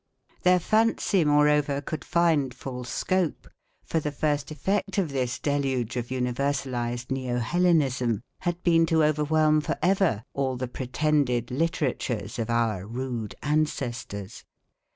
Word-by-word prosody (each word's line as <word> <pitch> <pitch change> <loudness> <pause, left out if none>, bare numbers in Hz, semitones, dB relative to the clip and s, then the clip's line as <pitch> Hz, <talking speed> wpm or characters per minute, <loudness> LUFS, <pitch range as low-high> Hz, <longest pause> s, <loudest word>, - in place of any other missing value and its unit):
Their 180 0 +5
fancy, 215 -2 +2
moreover, 150 -1 +3
could 155 +2 -5
find 155 -6 +2
full 125 -2 -6
scope, 185 +5 -1 0.4
for 165 - 0
the 150 -1 -3
first 145 -1 -1
effect 195 +7 -1
of 185 -5 +1
this 125 -3 -1
deluge 135 -5 -1
of 120 -1 -2
universalised 125 -1 -2
neo 130 -2 -1
Hellenism 130 - +1 0.2
had 175 0 -3
been 165 -1 +4
to 160 -1 +3
overwhelm 155 0 +3
for - - -2
ever 180 - +2
all 130 -2 -1
the 130 0 -3
pretended 125 -1 0
literatures 130 -7 -1
of 115 - -2
our 110 -5 0
rude 120 -2 -4
ancestors. 125 -9 -2
140 Hz, 130 wpm, -26 LUFS, 125-155 Hz, 0.4 s, Their